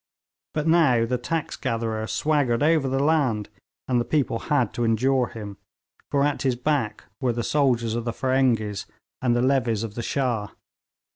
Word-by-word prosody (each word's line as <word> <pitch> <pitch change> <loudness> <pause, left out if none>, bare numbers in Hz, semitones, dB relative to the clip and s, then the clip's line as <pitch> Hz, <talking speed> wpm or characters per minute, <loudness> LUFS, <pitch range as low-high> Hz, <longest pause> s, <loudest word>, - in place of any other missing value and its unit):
But 150 -1 0
now 155 -9 +4
the 125 +1 -1
tax 160 +6 -3
gatherer 115 -3 -2
swaggered 145 -5 +1
over 155 -3 +3
the 135 - 0
land, 135 -9 +1 0.4
and 125 -2 +2
the - - 0
people 135 -5 0
had 145 - +2
to 120 - -2
endure 125 +3 +2
him, 105 -3 -8 0.5
for 140 -1 +2
at 145 -1 0
his 130 -2 +1
back 125 -5 -1 0.2
were 130 -4 0
the 120 0 -2
soldiers 120 -5 +1
of 120 0 -3
the 115 - -1
Feringhees 120 -6 0 0.3
and 120 -2 +2
the 120 - +2
levies 125 -5 +1
of 110 -3 -5
the 120 - -4
Shah. 120 -5 -1
125 Hz, 170 wpm, -24 LUFS, 115-140 Hz, 0.5 s, now